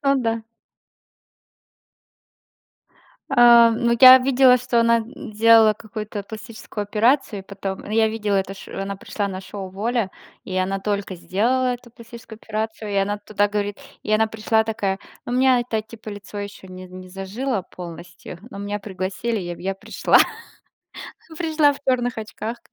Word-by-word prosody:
О 275 0 +3
да. 230 -3 -1 2.9
Э, 240 -2 +7
ну 235 +1 +1
я 260 0 +11
видела, 255 -1 +5
что 245 -1 +1
она, 230 0 +4
м, 230 +1 -8
сделала 225 0 +6
какую-то 215 -1 -7
пластическую 220 0 -7
операцию, 215 +1 +1
и - - -12
потом. 195 0 -6
Ну - - -10
я 220 0 +3
видела 210 -2 -1
это 195 0 -2
ш 195 - -12
что 195 - -4
она 200 0 -4
пришла 200 +1 -4
на 190 0 -5
шоу 195 0 -7
"Воля", 220 +1 -1 0.3
и 185 - -5
она 195 +1 -1
только 200 -2 -2
сделала 245 +8 0
эту 240 -1 -14
пластическую 230 -1 -12
операцию, 220 0 -4
и - - -3
она 205 +1 0
туда 205 0 0
говорит. 205 -1 -3 0.2
И 215 - -3
она 220 +1 +4
пришла 220 0 +1
такая: 200 -3 -2 0.3
"У - - -5
меня, 255 0 +4
это, 230 -2 -2
типо 220 0 -12
лицо 205 0 -8
ещё 200 -1 -7
не 185 0 -10
не 185 0 -11
зажило 195 +4 -3
полностью, 175 -1 -10
но 200 - -9
меня 205 0 -4
пригласили 195 +3 -3
и 175 -1 -5
в, - - -16
я 195 +1 -2
пришла". - - +2 1.2
Пришла 315 -3 +3
в 280 - -10
чёрных 245 -3 0
очках. 220 +2 -6
215 Hz, 165 wpm, -22 LUFS, 195-235 Hz, 2.9 s, я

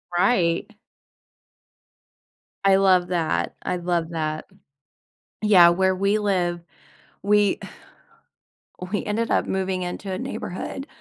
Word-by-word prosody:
Right. 175 -3 +2 2.0
I 195 -1 +6
love 185 -2 +4
that. 160 - -1
I 180 - -2
love 175 -2 -1
that. 155 -2 -3 1.0
Yeah, 190 -5 +7
where 190 +2 +2
we 200 +2 +1
live, 180 -4 0 0.6
we 205 0 +3 1.0
uh, 180 - -12
we 205 - -1
ended 225 +2 -2
up - - +1
moving 190 -1 -2
into 180 +2 -5
a 185 - -3
neighborhood, 265 +12 -5
185 Hz, 110 wpm, -23 LUFS, 175-200 Hz, 2.0 s, Yeah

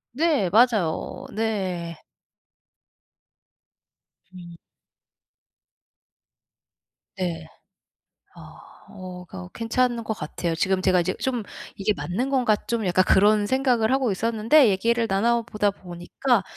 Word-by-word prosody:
네 295 - +2
맞아요. 215 -7 +1
네. 185 -7 -3 2.3
음. 175 -2 -11 2.6
네. 165 -3 -4 0.9
아 - - -14 0.3
어 185 -2 -9
거 185 0 -9
괜찮은 235 +1 0
것 220 - -3
같아요. 165 0 -4
지금 190 +1 0
제가 185 -1 +3
이제 180 +2 -1
좀 245 -5 -2 0.3
'이게 205 +2 0
맞는 245 +10 -3
건가?' 245 -6 +2
좀 230 -3 -1
약간 185 +1 +2
그런 205 +1 +4
생각을 250 -2 +1
하고 265 -4 +1
있었는데 230 +7 +3
얘기를 230 +4 +1
나눠 230 +4 +1
보다 210 -3 0
보니까 185 +5 -2
210 Hz, 195 characters per minute, -24 LUFS, 185-235 Hz, 2.6 s, 그런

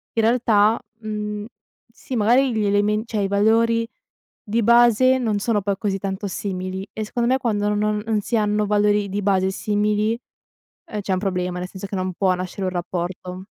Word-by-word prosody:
in 225 - +3
realtà, 225 -2 +3 0.2
mhmm, 210 -1 -4 0.5
sì 250 +2 -7
magari 245 +5 +3
gli 215 -1 0
elemen 205 +1 +2
cioè 220 -3 -2
i 195 - +1
valori 230 +3 +3 0.6
di 230 +1 0
base 240 +3 +5
non 220 -5 0
sono 210 0 0
poi 200 0 -1
così 200 -1 -1
tanto 195 +1 -4
simili, 190 0 -4
e 215 - -4
secondo 235 +2 -1
me 260 - +3
quando 210 -5 0
non 210 0 0
non 220 -2 0
si 235 - -2
hanno 210 -1 +1
valori 205 0 +2
di 200 +2 -2
base 190 -1 +2
simili, 210 +2 0 0.7
ehm, 210 -10 -5
c'è 195 -1 -2
un 185 - 0
problema, 180 -2 -2
nel 180 - -4
senso 190 +1 -8
che 195 - -5
non 185 0 -2
può 185 +1 +2
nascere 185 +2 -5
un - - -1
rapporto. 180 +1 -4
210 Hz, 185 wpm, -22 LUFS, 195-225 Hz, 0.7 s, base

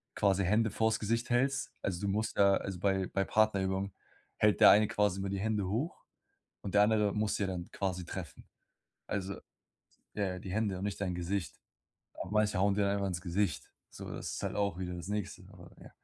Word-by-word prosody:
quasi 100 -1 +2
Hände 110 +2 +2
vors 110 0 +1
Gesicht 115 +3 -1
hältst. 135 +2 +1
Also, 90 -1 -2
du 100 - -1
musst 105 +3 -1
ja 100 -1 +6
also, 95 -3 -4
bei 95 -1 +1
bei 95 - 0
Partnerübungen 100 -2 +1 0.4
hält 105 -1 +3
der - - +10
eine 105 0 +5
quasi 105 -2 +1
immer 95 0 -2
die 100 0 -2
Hände 105 -2 0
hoch 125 - -3 0.6
und 100 - -5
der 105 - +7
andere 105 -2 +2
muss 105 -1 0
ja 100 - 0
dann 90 -2 -4
quasi 90 -3 -2
treffen. 90 -3 -7 0.6
Also, 100 -1 -3 0.8
ja, 105 - 0
ja, - - -6
die 95 - -8
Hände 100 -3 0
und 95 - -4
nicht 105 - -3
dein 90 -3 -1
Gesicht. 90 -4 -3 0.6
Aber 95 - -5
manche 105 -3 +2
hauen 100 +1 +3
dir 105 - +1
dann 100 - +2
einfach 100 -1 0
ins 85 -2 -3
Gesicht, 90 -2 -1 0.2
so - - -9
das - - -5
ist - - -5
halt - - -2
auch 100 -4 0
wieder 90 -1 -4
das 90 +2 -7
nächste, 105 -2 -3
aber - - -14
ja. - - -13
100 Hz, 210 wpm, -32 LUFS, 95-105 Hz, 0.8 s, der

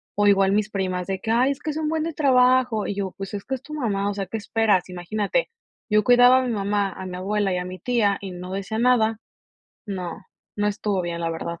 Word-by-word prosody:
o 205 0 +3
igual 195 -1 +4
mis 210 0 +1
primas 185 -3 -2
de 190 -1 -2
que: 220 - -3
"Ay 250 +4 +3
es 275 - -5
que 310 - -3
es 300 - -5
un 310 -1 -1
buen 320 0 0
de 330 0 -3
trabajo", 255 -5 +3
y 205 - -3
yo: 195 -2 -3
"Pues, 195 0 -6
es 200 -1 -4
que 265 - -2
es 260 - -9
tu 305 - -10
mamá, 205 -8 -1
o - - -2
sea, 200 -1 -3
¿qué 225 - -4
esperas?" 210 -3 +1
Imagínate. 205 - -2 0.4
Yo 210 0 +3
cuidaba 245 +1 +7
a - - -1
mi - - -1
mamá, 200 -1 0
a 190 - -8
mi 180 -1 -6
abuela 200 +1 0
y - - 0
a 180 - -3
mi 185 0 -7
tía, 210 -3 +1
y 195 -2 -6
no 180 +1 -7
decía 200 +3 -3
nada. 225 -3 +3 0.7
No, 185 -1 -5 0.3
no 205 0 0
estuvo 205 -2 -1
bien, 170 -1 -4
la 165 0 -1
verdad. 170 +1 -5
205 Hz, 255 wpm, -23 LUFS, 190-245 Hz, 0.7 s, cuidaba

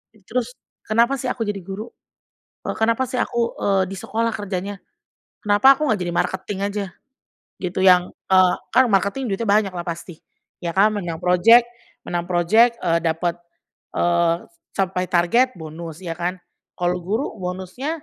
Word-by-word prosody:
E 205 - -24
Terus 250 +1 -2 0.3
kenapa 235 +5 +2
sih 260 - -3
aku 245 -2 -2
jadi 205 -2 -3
guru? 195 +5 -7 0.7
Eee, - - -2
kenapa 230 +3 +2
sih 255 - -3
aku, 235 -1 -1
eee, 195 -1 +2
di 195 - -6
sekolah 230 +3 -1
kerjanya? 200 -1 -4 0.7
Kenapa 210 +6 +6
aku 300 +2 -1
nggak 220 - +2
jadi 175 - -3
marketing 190 +2 -2
aja, 205 0 -3 0.7
gitu, 185 0 -3
yang, 180 -1 +5 0.2
eee, 185 -1 +5 0.2
kan 260 +1 +7
marketing 200 +7 +1
duitnya 200 +3 -2
banyak 200 -1 +3
lah 175 -1 -6
pasti, 170 -1 -6 0.4
iya 170 - -2
kan? 210 +3 +5
Menang 175 -5 -4
project 215 +7 +6 0.4
menang 175 0 -3
project, 185 +7 +4
eee, 170 -2 +2
dapet, 170 +1 -1 0.6
eee, 170 -1 +2 0.4
capai 185 -1 -1
target, 235 +10 +2
bonus 160 +1 -9
ya 165 -2 -5
kan. 175 +1 -1 0.4
Kalau 180 0 0
guru 205 +9 -2
bonusnya 190 - -5
195 Hz, 155 wpm, -22 LUFS, 175-225 Hz, 0.7 s, kan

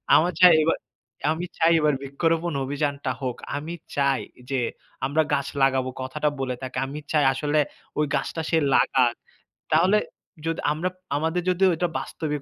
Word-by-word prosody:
আমার 175 +3 +4
চাই 180 -2 +10
এবার 165 - +2 0.6
"আমি 170 +3 -4
চাই, 165 +1 +4
এবার 150 -1 +3
বৃক্ষরোপণ 165 +4 0
অভিযানটা 140 -1 -2
হোক", 125 -2 -3 0.2
আমি 160 +4 -5 0.2
চাই 140 -1 +2 0.3
যে, 135 - +1 0.5
আমরা 155 +3 +2
গাছ 140 -1 +1 0.2
লাগাবো, 130 -1 +2
কথাটা 150 +3 -1
বলে 130 -1 -2
থাকে 130 0 -5
আমি 145 +2 -6
চাই 150 -2 +4
আসলে 145 +3 0 0.4
ওই 150 - +3
গাছটা 165 - -2
সে 165 - +3 0.2
লাগাক, 125 -3 +3 0.6
তাহলে 185 +6 +5 0.5
যদি 165 0 -1
আমরা, 170 +4 -1 0.3
আমাদের 160 +3 0
যদি 185 +1 +1
ওইটা 175 +2 0
বাস্তবিক 150 -3 -4
150 Hz, 155 wpm, -25 LUFS, 135-165 Hz, 0.6 s, চাই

